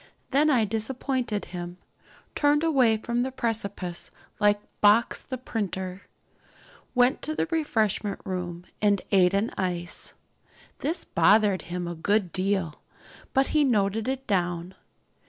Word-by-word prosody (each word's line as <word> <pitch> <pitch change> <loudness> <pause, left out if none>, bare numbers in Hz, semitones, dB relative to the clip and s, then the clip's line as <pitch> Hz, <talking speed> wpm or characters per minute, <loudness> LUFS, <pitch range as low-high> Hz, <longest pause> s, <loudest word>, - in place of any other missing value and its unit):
Then 290 +3 +4
I 245 -7 +4
disappointed 230 +1 -2
him, 175 0 -7 0.6
turned 295 +1 +3
away 260 -9 +4
from 235 +2 -1
the 260 +1 -1
precipice 200 -8 -3 0.3
like 205 -1 +4 0.2
Box 215 +3 +4
the 260 - -5
printer, 190 -6 -4 0.9
went 250 +2 +3
to 310 - -3
the - - +1
refreshment 220 - 0
room 180 -2 -4 0.2
and 205 -2 +3
ate 190 -1 +4
an 210 +4 +1
ice. 175 -2 -3 0.6
This 320 +5 -2
bothered 210 -3 +4
him 175 0 -3
a 175 - -3
good 190 +2 +1
deal, 190 -4 -1 0.5
but 270 0 +3
he 305 -1 +3
noted 215 -3 +1
it 265 0 -2
down. 175 -2 -1
210 Hz, 130 wpm, -26 LUFS, 185-250 Hz, 0.9 s, Then